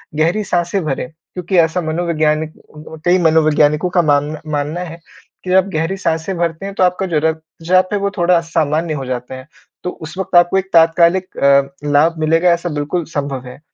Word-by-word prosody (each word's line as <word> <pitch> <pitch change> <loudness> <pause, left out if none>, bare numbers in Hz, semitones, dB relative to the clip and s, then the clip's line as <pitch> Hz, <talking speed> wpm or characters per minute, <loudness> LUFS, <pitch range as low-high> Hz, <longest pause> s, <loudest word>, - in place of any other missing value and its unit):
गहरी 170 +8 +1
साँसें 175 0 -1
भरें, 135 -3 -2 0.3
क्योंकि 180 +1 -2
ऐसा 165 +2 +3
मनोवैज्ञानिक 155 -1 -1 0.5
कई 180 +1 +4
मनोवैज्ञानिकों 155 0 +3
का 180 0 +2
मान 150 0 +1
मानना 150 +3 -2
है 170 -1 -7 0.4
कि 185 - -7
जब 185 - +4
आप 190 - +4
गहरी 165 +5 -1
साँसें 165 +1 -2
भरते 170 +2 -2
हैं, 200 - -5
तो 185 - +2
आपका 180 +1 +1
जो 165 -5 0
रक्तचाप 165 +3 0
है, 205 - +1
वो 200 0 0
थोड़ा 175 0 +3
सामान्य 160 0 0
हो 135 -2 -4
जाता 125 0 -5
है। 130 +2 -11 0.4
तो 180 - -2
उस 160 0 -9
वक़्त 190 -1 -3
आपको 175 +2 +5
एक 190 0 -2
तात्कालिक 170 +3 +3
अ, 140 0 +4 0.2
लाभ 160 +3 +3
मिलेगा, 165 +3 +2
ऐसा 170 +1 -1
बिल्कुल 150 +3 -2
संभव 140 -3 -3
है। 125 - -11
165 Hz, 190 wpm, -17 LUFS, 150-180 Hz, 0.5 s, आपको